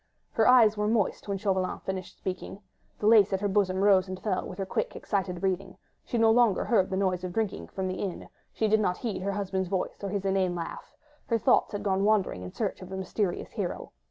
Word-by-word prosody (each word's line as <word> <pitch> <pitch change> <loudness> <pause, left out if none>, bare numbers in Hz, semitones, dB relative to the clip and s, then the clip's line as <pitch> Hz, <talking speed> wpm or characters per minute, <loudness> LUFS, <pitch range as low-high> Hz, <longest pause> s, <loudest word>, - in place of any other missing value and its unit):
Her 220 - +2
eyes 235 -4 +6
were 210 0 0
moist 215 -3 0
when 200 -1 -1
Chauvelin 190 -2 0
had - - -8
finished 190 -1 -5
speaking, 185 +1 -5 0.4
the - - -4
lace 210 -3 +6
at 190 - 0
her 205 - +1
bosom 195 -1 +1
rose 195 -2 +5
and 185 0 -6
fell 195 -4 -1
with 185 - -8
her 195 - -2
quick, - - -2
excited 190 -3 -2
breathing; 190 0 -2 0.3
she 240 - -3
no 225 -1 +5
longer 230 -4 +3
heard 205 -6 +2
the 190 - -2
noise 185 -2 0
of 180 -1 -4
drinking 220 -2 -2
from 190 -1 -4
the 185 - -3
inn, 190 -4 -4 0.2
she 220 - 0
did 215 +1 +3
not 180 -4 0
heed 225 -6 -3
her 200 +1 -1
husband's 190 -2 -2
voice 190 +1 -3
or 200 - -2
his 195 0 -3
inane 190 -2 +1
laugh, 170 -1 -7 0.3
her 230 - +2
thoughts 215 - +3
had 205 - -3
gone 195 -1 +1
wandering 205 - +2
in 90 0 -7
search - - -3
of 185 - -9
the 190 - -5
mysterious 190 0 -2
hero! - - -4
195 Hz, 235 wpm, -28 LUFS, 185-210 Hz, 0.4 s, eyes